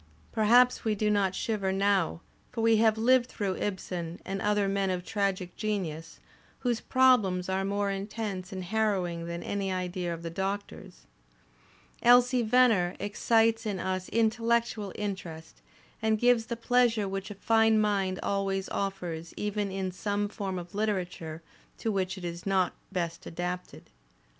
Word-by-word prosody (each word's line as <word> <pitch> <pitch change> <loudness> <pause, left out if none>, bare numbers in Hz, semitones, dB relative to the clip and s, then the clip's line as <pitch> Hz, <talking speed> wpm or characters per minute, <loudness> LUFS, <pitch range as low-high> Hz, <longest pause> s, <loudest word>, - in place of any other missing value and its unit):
Perhaps 245 +3 +4
we 220 -2 +1
do 210 +1 +1
not 195 -2 +1
shiver 205 -4 -1
now; 195 -3 +1 0.3
for 235 - -3
we 225 0 +4
have 220 0 +4
lived 245 +2 +4
through 195 -4 -2
Ibsen 180 -4 -4
and 195 +1 -3
other 210 -1 +2
men 195 0 0
of 180 -1 -2
tragic 195 -4 -1
genius, 170 -7 -3 0.4
whose 240 -3 0
"problems" 215 -9 +3
are 190 +1 0
more 200 +1 0
intense 195 -1 -4
and 185 -1 -5
harrowing 180 -4 -1
than 170 0 -5
any 195 -1 -2
idea 180 -1 -2
of 170 0 -6
the 165 - -4
Doctor's. 195 - -5 1.0
"Elsie 245 +1 +5
Venner" 220 -6 +3
excites 225 +2 +2
in 200 -2 -1
us 185 0 -2
intellectual 230 -2 +1
interest 185 -6 -6 0.4
and 220 0 +2
gives 240 0 +3
the 235 - -3
pleasure 235 -3 +2
which 195 +1 -4
a 205 - -7
fine 225 +1 +3
mind 195 -3 +1
always 195 -1 -1
offers 175 -4 -4
even 210 -1 -1
in 190 -1 -2
some 205 +2 -1
form 195 -2 -4
of 175 -1 -8
literature 180 -6 -3 0.3
to 225 - -1
which 190 -1 -1
it 180 - -7
is 170 0 -5
not 190 -3 +2 0.2
best 170 -3 -3
adapted. 180 +2 -5
200 Hz, 150 wpm, -29 LUFS, 185-220 Hz, 1.0 s, Elsie